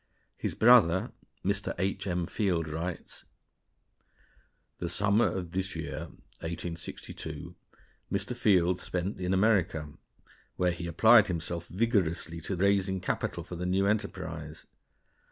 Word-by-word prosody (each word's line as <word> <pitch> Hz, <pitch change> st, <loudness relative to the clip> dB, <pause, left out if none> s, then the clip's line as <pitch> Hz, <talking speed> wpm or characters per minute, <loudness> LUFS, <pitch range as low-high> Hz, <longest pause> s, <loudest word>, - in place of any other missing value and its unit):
His -, -, -3 dB
brother, 110 Hz, -7 st, +5 dB, 0.3 s
Mr. 100 Hz, +1 st, 0 dB
H. 100 Hz, +1 st, -1 dB
M. 90 Hz, -2 st, 0 dB
Field, 90 Hz, -5 st, 0 dB
writes: 80 Hz, +3 st, -5 dB, 1.6 s
The 85 Hz, -, -2 dB
summer 100 Hz, +5 st, +3 dB
of 90 Hz, -3 st, -4 dB
this 95 Hz, +1 st, -2 dB
year -, -, -5 dB, 0.3 s
(1862) 85 Hz, 0 st, -6 dB, 0.6 s
Mr. 100 Hz, +5 st, -1 dB
Field 90 Hz, -6 st, +3 dB
spent 95 Hz, +2 st, -3 dB
in 90 Hz, 0 st, -1 dB
America, 95 Hz, -6 st, +2 dB, 0.7 s
where 90 Hz, -1 st, +2 dB
he 85 Hz, 0 st, -5 dB
applied 110 Hz, +6 st, +6 dB
himself 85 Hz, -1 st, -3 dB
vigorously 90 Hz, -5 st, 0 dB
to 95 Hz, -, -3 dB
raising 95 Hz, 0 st, +2 dB
capital 85 Hz, -1 st, -2 dB
for 90 Hz, -, -8 dB
the 90 Hz, +1 st, -3 dB
new 95 Hz, +2 st, +2 dB
enterprise. 80 Hz, -7 st, -3 dB
90 Hz, 120 wpm, -29 LUFS, 85-100 Hz, 1.6 s, applied